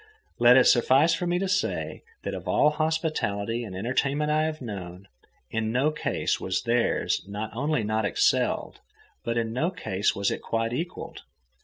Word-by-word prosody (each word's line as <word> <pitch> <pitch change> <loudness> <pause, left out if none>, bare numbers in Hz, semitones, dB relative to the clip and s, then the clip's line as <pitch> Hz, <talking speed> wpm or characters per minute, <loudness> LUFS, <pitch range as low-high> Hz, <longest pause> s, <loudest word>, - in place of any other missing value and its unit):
Let 120 +1 +7
it 130 - +7
suffice 135 +7 +5
for 175 +2 -1
me 175 0 +1
to 195 +2 -1
say 195 +1 -1 0.2
that - - -3
of - - -7
all 150 - +4
hospitality 150 -9 -1
and 100 -5 -7
entertainment 140 +8 0
I 155 +1 +2
have 155 -1 -3
known, 95 -5 -7 0.4
in 110 -1 -1
no 135 +6 +2
case 155 - -1
was 95 +4 -2
theirs 120 0 +1
not 105 +2 -5
only 145 0 0
not 110 +1 0
excelled, 100 - +1 0.4
but 115 0 -2
in 115 -1 -1
no 155 +8 +1
case 100 - -1
was 100 0 0
it - - -4
quite 115 +1 -1
equalled. 170 +8 -5
120 Hz, 170 wpm, -26 LUFS, 110-155 Hz, 0.4 s, Let